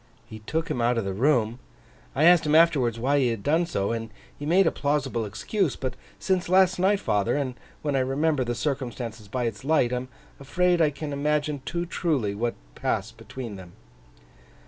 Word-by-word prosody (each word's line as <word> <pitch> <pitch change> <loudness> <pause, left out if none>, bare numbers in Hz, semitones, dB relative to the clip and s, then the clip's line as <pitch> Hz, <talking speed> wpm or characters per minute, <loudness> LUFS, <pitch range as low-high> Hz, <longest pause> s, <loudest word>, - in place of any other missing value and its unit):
'He 110 - -10
took 160 +9 -3
him 120 - -1
out 120 +1 +2
of 115 - -1
the 95 - -2
room. 120 0 +1 0.6
I 140 - +2
asked 170 -2 +6
him 150 - +3
afterwards, 140 -8 +4
why 140 +5 +2
he 130 - +3
had 115 -4 -2
done 165 +4 +2
so, 100 - -1
and 115 -1 -3 0.3
he 145 - -6
made 185 +4 +4
a - - +3
plausible 140 -6 -1
excuse; 160 - -1
but 130 -2 -4 0.2
since 185 -2 -1
last 185 0 +4
night, 195 +2 +3
father, 105 - 0
and 135 -3 -2 0.3
when 145 -2 0
I - - +3
remember 135 +2 +1
the 120 0 -2
circumstances 120 -6 -4
by 125 +4 -2
its 115 -3 -3
light, 140 -4 +2
I - - +1
am 125 +1 -5 0.3
afraid 175 +5 +1
I 155 - +5
can 145 0 -6
imagine 150 0 0
too 175 0 -2
truly 150 - -1
what 115 +3 -2 0.2
passed - - -2
between 120 -6 -7
them. 90 -2 -12
135 Hz, 195 wpm, -26 LUFS, 115-160 Hz, 0.6 s, asked